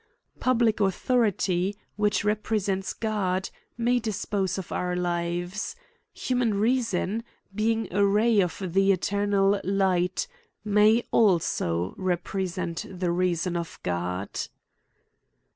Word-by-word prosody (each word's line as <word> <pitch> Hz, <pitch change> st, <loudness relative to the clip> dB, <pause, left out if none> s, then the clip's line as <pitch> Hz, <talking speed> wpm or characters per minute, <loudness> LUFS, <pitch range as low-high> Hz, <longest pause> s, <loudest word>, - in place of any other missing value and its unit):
Public 235 Hz, -4 st, +2 dB
au 195 Hz, -, +4 dB
thority, 200 Hz, -4 st, +1 dB, 0.2 s
which 210 Hz, -1 st, +1 dB
represents 210 Hz, -2 st, 0 dB
God, 190 Hz, -4 st, -1 dB, 0.3 s
may 240 Hz, +1 st, +2 dB
dispose 205 Hz, -4 st, -2 dB
of 190 Hz, -, -6 dB
our 180 Hz, 0 st, -1 dB
lives. 175 Hz, -, -2 dB, 0.4 s
Human 245 Hz, -4 st, 0 dB
reason, 225 Hz, -2 st, 0 dB, 0.3 s
being 220 Hz, +1 st, 0 dB
a 200 Hz, +1 st, +3 dB
ray 210 Hz, +2 st, +4 dB
of 180 Hz, -2 st, -2 dB
the 195 Hz, +1 st, +4 dB
eternal 200 Hz, +1 st, +1 dB
light, 185 Hz, -, +1 dB, 0.4 s
may 210 Hz, +3 st, +4 dB
also 95 Hz, -, +2 dB
represent 180 Hz, -1 st, -2 dB
the 180 Hz, -2 st, -2 dB
reason 175 Hz, 0 st, 0 dB
of 170 Hz, -1 st, -4 dB
God.'' 90 Hz, +2 st, -3 dB
195 Hz, 105 wpm, -26 LUFS, 180-215 Hz, 0.4 s, au